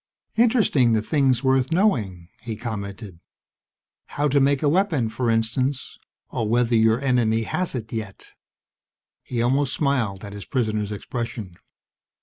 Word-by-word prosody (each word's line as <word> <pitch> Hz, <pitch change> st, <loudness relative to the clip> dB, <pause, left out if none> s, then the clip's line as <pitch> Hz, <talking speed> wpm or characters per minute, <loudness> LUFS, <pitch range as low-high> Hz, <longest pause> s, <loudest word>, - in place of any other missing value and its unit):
"Interesting, 220 Hz, -, +3 dB
the 110 Hz, -, +2 dB
things 135 Hz, -2 st, +2 dB
worth 130 Hz, +1 st, +2 dB
knowing," 105 Hz, -, 0 dB
he 115 Hz, -2 st, -5 dB
commented. 100 Hz, -4 st, -6 dB, 0.9 s
"How 145 Hz, +1 st, -1 dB
to 140 Hz, +1 st, +3 dB
make 140 Hz, +1 st, +2 dB
a -, -, +3 dB
weapon, 160 Hz, -, +2 dB
for 115 Hz, +2 st, -2 dB
instance, 120 Hz, +4 st, -1 dB, 0.3 s
or 110 Hz, -2 st, -2 dB
whether 120 Hz, +1 st, +2 dB
your 110 Hz, +1 st, +4 dB
enemy 120 Hz, -4 st, +1 dB
has 180 Hz, +7 st, -2 dB
it 110 Hz, -2 st, -6 dB
yet." 110 Hz, -4 st, -6 dB, 0.9 s
He 120 Hz, -2 st, -2 dB
almost 135 Hz, +2 st, +1 dB
smiled 120 Hz, -9 st, -1 dB
at 100 Hz, -, -8 dB
his 100 Hz, -1 st, -8 dB
prisoner's 110 Hz, -5 st, -1 dB
expression. 105 Hz, -3 st, -5 dB
120 Hz, 135 wpm, -23 LUFS, 110-135 Hz, 0.9 s, your